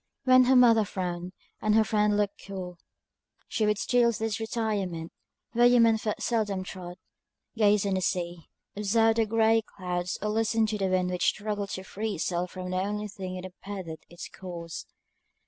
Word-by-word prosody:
When 255 -1 +6
her 260 +1 +4
mother 230 -3 +6
frowned, 180 -3 -4 0.3
and 215 0 +2
her 220 - +6
friend 210 -1 +2
looked 205 -1 -2
cool, 180 -3 -6 0.7
she 215 - 0
would 210 -1 +2
steal 240 +2 +3
to 225 - -5
this 220 -1 -2
retirement, 205 -7 -2 0.4
where 240 +1 +6
human 230 -2 +5
foot 215 -1 -3
seldom 205 -5 0
trod 180 -2 -8 0.6
gaze 210 -2 +3
on 200 - 0
the 190 - 0
sea, 175 -2 -2 0.3
observe 225 +2 +2
the 225 -1 +2
grey 225 +1 +3
clouds, 180 -4 -4
or 210 - -2
listen 225 +1 +2
to 215 -1 -2
the 195 - +1
wind 185 -1 +1
which 180 0 0
struggled 205 -1 -1
to 190 - -7
free 210 +2 -4
itself 175 +2 -1
from 180 0 -6
the 185 - -1
only 210 +2 -2
thing 190 -3 -6
that 185 0 -6
impeded 185 -3 -7
its 175 - -8
course. 170 -4 -8
205 Hz, 180 wpm, -28 LUFS, 185-220 Hz, 0.7 s, When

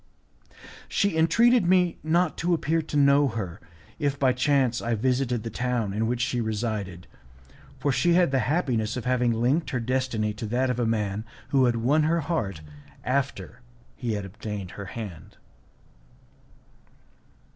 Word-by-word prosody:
She 200 -4 +1
entreated 220 +7 +4
me 180 -2 +3
not 165 +1 +1
to 175 +1 +2
appear 160 +1 0
to 150 -1 -4
know 140 0 +5
her, 105 -8 -5 0.4
if 140 -1 0
by 130 -2 +3
chance 130 -2 +1
I 120 0 0
visited 125 0 0
the 115 - -5
town 120 -4 -1
in 110 +2 0
which 120 +1 -1
she 125 -1 0
resided, 105 -5 -3 0.7
for 145 - 0
she 170 +6 +2
had 175 -4 +4
the 135 - +2
happiness 125 -8 0
of 125 - -5
having 125 -1 +2
linked 125 +8 +1
her 130 - -1
destiny 120 -3 -1
to 105 +1 -6
that 125 +3 +1
of 125 - -3
a 120 - +1
man 105 -2 -1 0.3
who 135 -2 +4
had 120 -1 +2
won 130 +7 +2
her 165 +2 +2
heart 115 - -2 0.4
after 125 -4 -2 0.3
he 120 -3 -3
had 105 -2 -3
obtained 100 -1 -6
her 100 - -8
hand. 95 -6 -8
125 Hz, 155 wpm, -26 LUFS, 110-145 Hz, 0.7 s, know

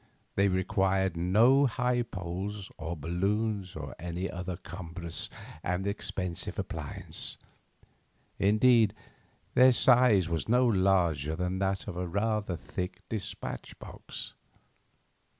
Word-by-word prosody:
They 100 +1 +3
required 95 0 +1
no 115 +11 +5
high 125 0 +1
poles, 95 -1 -5
or 80 +2 -4
balloons, 95 +5 -1
or 70 -3 -6
any 90 +3 -3
other 90 0 -4
cumbrous 85 -2 -6 0.3
and 90 +3 -1
expensive 95 -3 -3
appliance; - - -2 1.0
indeed, 110 +1 +5 0.6
their 130 +1 +7
size 120 -7 +5
was 85 +4 -2
no 125 +2 +5
larger 90 - +2
than 90 +2 -2
that 95 -1 -1
of 85 - -5
a 90 0 -2
rather 105 0 0
thick 90 +3 -6
despatch 110 -4 -5
box. - - -7
95 Hz, 110 wpm, -30 LUFS, 90-110 Hz, 1.0 s, their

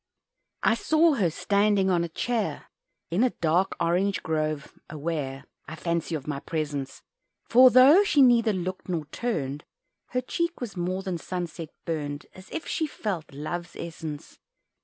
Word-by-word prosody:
I - - +5
saw 315 +7 +3
her 200 -10 +2
standing 200 +3 +2
on 175 -1 +2
a 170 - -3
chair 225 +6 -2 0.4
In 180 +6 +2
a 255 - +4
dark 170 +4 +1
orange 180 +4 +1
grove 155 -2 -2
aware, 145 -3 -4 0.2
I 155 - -6
fancy, 170 0 -2
of 145 -3 -5
my 145 -2 -3
presence; 145 -3 -4 0.4
For 255 +2 +7
though 270 +10 +8
she 295 -8 +4
neither 235 -3 +5
looked 185 -1 -4
nor 165 -4 -1
turned, 150 - -2 0.4
Her 250 - -1
cheek 340 +6 -2
with 240 -6 -5
more 185 +2 -2
than 185 -3 -3
sunset 170 -2 -5 0.2
burned, 145 -3 -3
As 185 0 -14
if 325 - -5
she 315 - -1
felt 195 - -4
Love's 170 +4 -5
essence. 160 -3 -7
175 Hz, 155 wpm, -26 LUFS, 155-220 Hz, 0.4 s, though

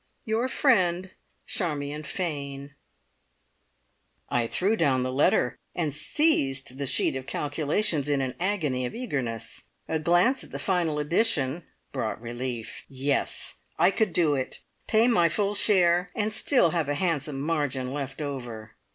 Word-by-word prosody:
"Your 225 +2 +1
friend, 190 - +2 0.3
Charmion 150 -4 -2
Fane." 140 -4 -4 1.6
I 120 -1 +1
threw 195 - +1
down 135 - +2
the 130 0 -2
letter 130 -2 +2 0.2
and 160 -5 -1
seized 140 - +1
the 140 - -2
sheet - - +2
of 130 0 -5
calculations 150 +2 +1
in 145 -1 +2
an 130 -2 -1
agony 155 -10 0
of - - -8
eagerness. 135 - -4 0.2
A 160 - 0
glance 175 - +3
at - - -12
the - - -5
final 175 -5 0
addition 155 - +1 0.3
brought 115 -6 -3
relief. 120 0 -5
Yes! 140 +1 -1 0.2
I 175 +4 +5
could 215 -2 +1
do 165 -3 +2
it 130 -2 -3 0.3
pay 225 +2 +4
my 175 -9 +4
full 200 +4 0
share, 180 -4 +3
and 215 0 0
still 220 - +3
have 160 -4 -1
a 145 - +1
handsome 150 -4 -1
margin 140 -4 -1
left 140 +1 -4
over. 120 -6 -6
150 Hz, 145 wpm, -27 LUFS, 135-180 Hz, 1.6 s, I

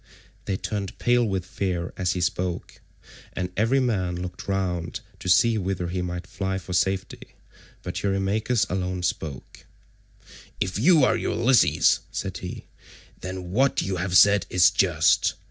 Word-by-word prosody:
They 95 - -1
turned 100 0 -4
pale 120 0 +2
with 95 -5 -2
fear 90 -3 -3
as 90 -1 0
he 90 - -3
spoke, 90 0 -3 0.5
and 90 -1 -3
every 115 +6 +2
man 95 -9 0
looked 90 +1 -7
round 90 -4 -2
about - - -29
to - - -5
see 110 +5 +4
whither 90 -2 -2
he 90 +1 -2
might 90 0 -4
fly 95 -1 -3
for 90 0 -7
safety, 95 +1 -2 0.5
but - - -4
Eurymachus 100 +4 0
alone 90 -1 -3
spoke. 75 -6 -5 0.9
"If 95 +2 -2
you 160 +3 +5
are - - +4
Ulysses," 125 +1 +3
said - - -4
he, - - -7 0.5
"then 90 -1 -6
what 130 +6 +2
you 95 0 -2
have 90 +1 +2
said 100 -2 +5
is 90 0 +5
just. 90 -5 +2
95 Hz, 150 wpm, -25 LUFS, 90-100 Hz, 0.9 s, you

